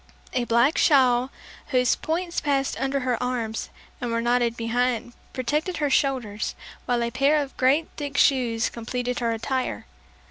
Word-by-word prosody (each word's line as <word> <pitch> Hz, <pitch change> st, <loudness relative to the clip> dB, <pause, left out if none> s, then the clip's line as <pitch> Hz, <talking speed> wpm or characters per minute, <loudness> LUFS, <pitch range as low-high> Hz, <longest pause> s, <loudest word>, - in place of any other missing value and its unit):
A 245 Hz, -1 st, 0 dB
black 235 Hz, +6 st, +3 dB
shawl 255 Hz, -4 st, +4 dB, 0.4 s
whose 250 Hz, -3 st, +2 dB
points 340 Hz, +2 st, -2 dB
passed 275 Hz, -2 st, 0 dB
under 270 Hz, +1 st, 0 dB
her 250 Hz, -2 st, -1 dB
arms 235 Hz, -3 st, -2 dB, 0.3 s
and 245 Hz, -, -2 dB
were 230 Hz, 0 st, 0 dB
knotted 240 Hz, 0 st, +1 dB
behind, 240 Hz, 0 st, -1 dB, 0.2 s
protected 300 Hz, +8 st, -1 dB
her 295 Hz, -3 st, 0 dB
shoulders, 245 Hz, -7 st, 0 dB, 0.3 s
while 240 Hz, -1 st, +1 dB
a 235 Hz, -, -2 dB
pair 280 Hz, +4 st, +3 dB
of 285 Hz, -2 st, -3 dB
great 280 Hz, +5 st, +3 dB
thick 285 Hz, -1 st, -4 dB
shoes 240 Hz, -4 st, +3 dB
completed 245 Hz, +1 st, -3 dB
her 235 Hz, -1 st, 0 dB
attire. 235 Hz, -, -2 dB
250 Hz, 150 wpm, -25 LUFS, 235-275 Hz, 0.4 s, shawl